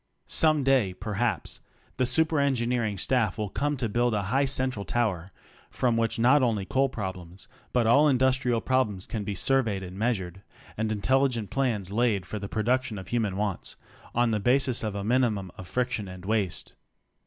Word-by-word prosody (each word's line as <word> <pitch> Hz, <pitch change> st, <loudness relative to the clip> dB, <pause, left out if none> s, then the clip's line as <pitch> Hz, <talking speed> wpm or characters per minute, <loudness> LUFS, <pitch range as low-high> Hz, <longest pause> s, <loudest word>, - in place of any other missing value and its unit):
^ome 155 Hz, -3 st, +3 dB
day 130 Hz, -9 st, +2 dB
perhaps 105 Hz, -2 st, -2 dB, 0.4 s
the 125 Hz, -1 st, +1 dB
super 160 Hz, +4 st, +3 dB
engineering 120 Hz, -6 st, 0 dB
staff 110 Hz, -1 st, +1 dB
will 105 Hz, -3 st, -3 dB
come 145 Hz, 0 st, -1 dB
to 125 Hz, -2 st, -1 dB
build 120 Hz, +1 st, +1 dB
a 100 Hz, -, 0 dB
high 140 Hz, +1 st, +3 dB
central 130 Hz, -5 st, 0 dB
tower 100 Hz, -7 st, -1 dB, 0.4 s
from 120 Hz, -2 st, 0 dB
which 115 Hz, 0 st, 0 dB
not 130 Hz, +5 st, +5 dB
only 110 Hz, -6 st, +1 dB
coal 135 Hz, +6 st, +1 dB
prob 95 Hz, -6 st, -4 dB
lems 90 Hz, +1 st, -11 dB, 0.3 s
but 125 Hz, -2 st, +2 dB
all 140 Hz, +7 st, +5 dB
industrial 130 Hz, -2 st, +2 dB
problems 115 Hz, -8 st, 0 dB
can 110 Hz, -3 st, -4 dB
be 100 Hz, -1 st, -4 dB
surveyed 110 Hz, -3 st, +1 dB
and 95 Hz, +1 st, -8 dB
meas 120 Hz, +1 st, +2 dB
ured, 95 Hz, 0 st, -8 dB, 0.3 s
and 110 Hz, 0 st, -1 dB
intelligent 120 Hz, 0 st, +1 dB
plans 115 Hz, -8 st, -1 dB
laid 105 Hz, -4 st, +1 dB
for 105 Hz, -, -5 dB
the 100 Hz, 0 st, -6 dB
production 120 Hz, +1 st, 0 dB
of 95 Hz, -, -9 dB
human 110 Hz, -5 st, -1 dB
wants 100 Hz, -3 st, -3 dB, 0.4 s
on 120 Hz, 0 st, +2 dB
the 105 Hz, -, 0 dB
basis 125 Hz, +2 st, +2 dB
of 105 Hz, -2 st, -3 dB
a 100 Hz, -, -3 dB
minimum 110 Hz, -5 st, +1 dB
of 90 Hz, -, -10 dB
friction 120 Hz, -4 st, -2 dB
and 95 Hz, 0 st, -10 dB
waste. 105 Hz, -4 st, -1 dB
115 Hz, 180 wpm, -27 LUFS, 100-130 Hz, 0.4 s, not